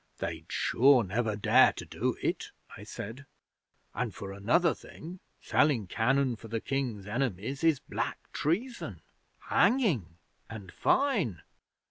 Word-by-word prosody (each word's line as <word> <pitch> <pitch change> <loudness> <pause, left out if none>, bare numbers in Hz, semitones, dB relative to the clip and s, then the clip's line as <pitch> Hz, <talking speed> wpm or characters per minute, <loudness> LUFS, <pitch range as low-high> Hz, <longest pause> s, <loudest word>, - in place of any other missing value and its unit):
"They'd - - -5
sure 130 -1 +4
never 110 +3 -1
dare 105 - +5
to - - -8
do - - -2
it," - - -1 0.3
I - - -11
said; 125 +7 -8 0.7
"and, 115 -1 -3
for 95 -1 -7
another 120 - +2
thing, 175 +4 -11 0.2
selling 140 -8 +2
cannon 125 +5 +1
to 115 - -11
the 115 +1 -2
King's 125 -7 -3
enemies 120 - -2
is 160 -4 +4
black - - -3 0.2
treason 225 - -2 0.4
hanging 150 - +1 0.3
and 100 -5 -9
fine." 200 - +1
125 Hz, 125 wpm, -30 LUFS, 105-150 Hz, 0.7 s, dare